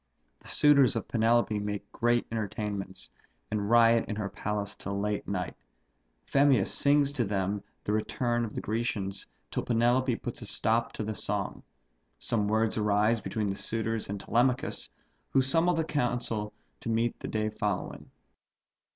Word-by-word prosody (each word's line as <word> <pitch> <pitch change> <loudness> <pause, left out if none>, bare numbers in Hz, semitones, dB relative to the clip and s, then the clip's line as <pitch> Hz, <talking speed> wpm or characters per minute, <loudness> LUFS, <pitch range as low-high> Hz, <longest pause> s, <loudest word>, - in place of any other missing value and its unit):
The - - -14
suitors 140 -5 +5
of - - -3
Penelope 115 -2 +2
make 105 0 -4
great 120 0 +2
entertainments, 105 -3 -3 0.4
and 105 -1 -1
riot 115 -1 +5
in 105 - -2
her 105 -2 -3
palace 105 0 -3
till 100 +1 -4
night. 100 -3 -2 0.7
Phemius 135 - +3
sings 140 0 +3
to 140 -4 0
them 100 -1 -1 0.2
the - - -2
return 120 +2 0
of 110 - -5
the - - -2
Grecians, 105 -3 -2 0.2
till - - -1
Penelope 120 +2 +2
puts 120 +3 -6
a 115 - -6
stop 115 +3 +1
to - - -4
the 110 +1 -3
song. 100 -1 -2 0.6
Some 105 - 0
words 110 +1 +1
arise 105 +2 +2
between 105 -3 -2
the - - -3
suitors 115 +1 -2
and 100 0 -3
Telemachus, 125 +5 0 0.4
who 135 - +4
summons 165 +6 +2
the 160 - +2
council 120 -7 -1 0.3
to - - -5
meet 115 +1 0
the - - -5
day 110 0 -1
following. - - -3
110 Hz, 150 wpm, -29 LUFS, 105-120 Hz, 0.7 s, suitors